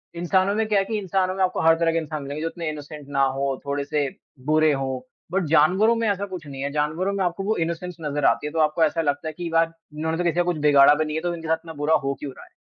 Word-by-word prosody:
इंसानों 185 +3 +1
में 220 +1 +1
क्या 210 -2 +3
है 195 - 0
कि 220 +2 -2
इंसानों 190 -1 0
में 190 - +1
आपको 185 - 0
हर 165 0 +5
तरह 165 -1 +3
के 165 - 0
इंसान 155 -2 -3
मिलेंगे 140 +2 -5
जो 165 - -1
इतने 165 -1 -5
इनोसेंट 150 -1 -8
ना 140 -1 +2
हों, 135 0 0
थोड़े-से 140 +1 -1 0.4
बुरे 155 +1 +4
हों 135 -1 -2 0.3
बट 190 -1 0
जानवरों 180 +9 +4
में 230 -1 0
ऐसा 200 0 -1
कुछ 185 -5 -8
नहीं 135 -1 -7
है। 140 - -1
जानवरों 155 +6 -1
में 195 -1 0
आपको 180 +2 -2
वो 215 +3 0
इनोसेंस 170 +1 -5
नज़र 145 -2 -1
आती 150 - +2
है - - -5
तो 165 - -1
आपको 155 +1 +3
ऐसा 165 +1 +2
लगता 145 0 -1
है 155 - -4
कि 175 -1 -4
यार, 165 0 +3 0.3
इन्होंने 160 +1 -1
तो 175 - -1
किसी 170 -2 +1
का 175 - +3
कुछ 175 -2 -1
बिगाड़ा 140 0 +7
भी 155 +1 0
नहीं 155 0 -4
है 160 - -1
तो 175 0 -1
इनके 165 -1 -8
साथ 160 0 +2
इतना 165 -1 -9
बुरा 160 +2 +4
हो 135 0 0
क्यों 145 - -5
रहा - - -13
है। - - -21
160 Hz, 290 wpm, -24 LUFS, 150-180 Hz, 0.4 s, बिगाड़ा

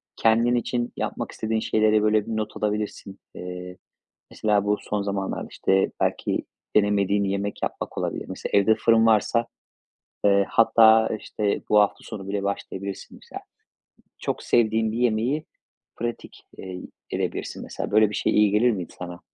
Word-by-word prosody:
kendin 115 +2 +3
için 120 0 -2
yapmak - - -3
istediğin 110 0 -2
şeyleri, 110 -1 +2
böyle, 105 -1 +2
bir 110 - -2
not 110 -1 -4
alabilirsin. 105 -2 -3 0.2
Eee, 90 0 -7 0.5
mesela, 105 -2 +1
bu 105 0 +2
son 105 -1 -2
zamanlarda, 100 -1 -3
işte, 95 0 +1
belki - - -1 0.3
denemediğin 100 -1 +3
yemek 100 +1 -2
yapmak - - -4
olabilir. - - -3
Mesela, - - -6
evde 100 +2 +5
fırın 115 0 +4
varsa, 115 +1 +3 0.8
eee, 100 -1 +5
hatta, 110 -1 +5
işte, 105 -1 -2
bu 105 - +5
hafta 105 - 0
sonu 95 -2 -8
bile 100 0 -2
başlayabilirsin, 100 -1 -5
mesela. - - -9 0.8
Çok - - -3
sevdiğin 110 -1 +2
bir 110 - -4
yemeği 125 +5 +1 0.5
pratik, 120 0 -6
eee, 90 -1 -7 0.3
edebilirsin, - - -3
mesela. - - -5
Böyle 110 0 +5
bir 105 - -5
şey - - 0
iyi 105 -1 +4
gelir 115 +4 +4
miydi 95 -6 -5
sana? 90 -1 -7
105 Hz, 150 wpm, -24 LUFS, 100-110 Hz, 0.8 s, evde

